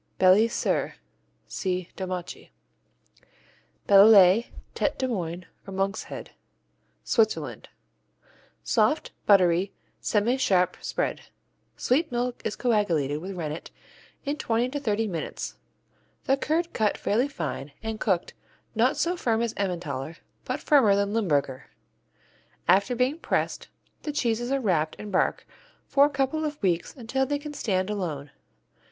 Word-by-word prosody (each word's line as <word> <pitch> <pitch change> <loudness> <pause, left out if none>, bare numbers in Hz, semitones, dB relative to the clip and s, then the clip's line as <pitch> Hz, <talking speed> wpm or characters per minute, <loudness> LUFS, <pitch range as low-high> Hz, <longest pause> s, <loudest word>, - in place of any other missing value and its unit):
Beli 190 +4 +6
Sir 230 - -1 0.5
see 185 -2 -3
Domaci. 185 -2 -5 1.4
Bellelay, 200 +1 +7 0.3
Tête - - -1
de 260 - -1
Moine, 180 -6 -3 0.2
or 195 - -7
Monk's 195 0 -1
Head - - -8 0.7
Switzerland 220 -1 0 0.9
Soft, 225 +7 +1 0.2
buttery, 185 -1 +4 0.3
semisharp 205 -5 +2
spread. - - -2 0.6
Sweet 300 +5 +1
milk 245 0 -2
is 215 - -2
coagulated 170 - +1
with 190 +4 -6
rennet 160 -2 -5 0.6
in 285 +1 -1
twenty 235 -3 0
to 290 +2 -3
thirty 225 -4 0
minutes, 170 -7 -5 0.6
the 270 - +3
curd 325 +5 -1
cut 215 -2 +1
fairly 235 +7 +1
fine 150 - -5
and 220 -1 -4
cooked 185 -4 0 0.4
not 240 +5 +2
so 350 +2 +1
firm 230 -8 0
as 235 - -2
Emmentaler, 165 -6 -3 0.3
but 255 +3 -2
firmer 260 -11 +4
than 200 0 0
Limburger. 145 - 0 1.0
After 200 +8 +4
being 255 +6 0
pressed, - - -1 0.3
the 300 - -3
cheeses 240 -3 -1
are 275 - +2
wrapped 170 -10 0
in 210 - -8
bark 185 - +1 0.4
for 280 0 +5
a - - +1
couple 280 +2 -1
of 300 -1 -3
weeks 175 -3 0
until 265 +1 -1
they 290 - 0
can 295 +1 -8
stand 190 -7 -1
alone. 155 -8 -4
210 Hz, 130 wpm, -26 LUFS, 180-255 Hz, 1.4 s, Bellelay